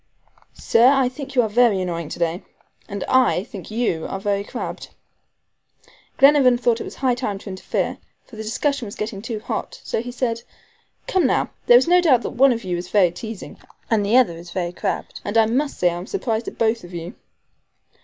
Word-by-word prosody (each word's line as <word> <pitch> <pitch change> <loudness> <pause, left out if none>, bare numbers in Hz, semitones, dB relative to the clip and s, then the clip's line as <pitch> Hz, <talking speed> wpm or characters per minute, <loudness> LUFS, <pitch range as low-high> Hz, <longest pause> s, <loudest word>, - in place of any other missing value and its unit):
"Sir, 230 +2 +4
I 270 -1 +4
think 270 +1 -9
you 245 - +5
are - - 0
very 220 -2 +3
annoying 170 -4 -3
to - - -6
day." 170 +1 -1 0.5
"And 200 -1 -4
I 255 -8 +3
think 200 -6 -10
you 215 -8 -1
are 195 - -4
very 200 0 -1
crabbed." - - -6 1.3
Glenarvan 275 -3 +6
thought 240 -1 +1
it - - -5
was - - -8
high 260 -2 +1
time 240 -5 -3
to 200 - -10
interfere, 185 - -3 0.3
for 235 - -14
the 220 - -6
discussion 245 +3 -1
was 200 - -8
getting 210 -2 -5
too 225 0 -4
hot, - - -5
so - - -2
he 245 +1 -6
said: 235 -2 -2 0.6
"Come, 365 -7 +2
now, - - 0 0.2
there 240 - +9
is 255 - +2
no 355 +1 +5
doubt 265 -9 +3
one 270 +1 +4
of 230 -1 -2
you 180 -2 -2
is 175 +1 -6
very 190 -5 +4
teasing 220 +3 -8 0.3
and 215 -2 +3
the 210 +5 +3
other 250 -9 +4
is 170 +1 -11
very 175 -1 -3
crabbed, - - -4
and 205 +3 -1
I 225 - +6
must 265 +6 -1
say 175 -1 +3
I 170 - -4
am 180 - -8
surprised 230 - -2
at - - -7
both 225 0 +1
of 175 0 -10
you." 170 +1 -6
225 Hz, 210 wpm, -22 LUFS, 190-250 Hz, 1.3 s, there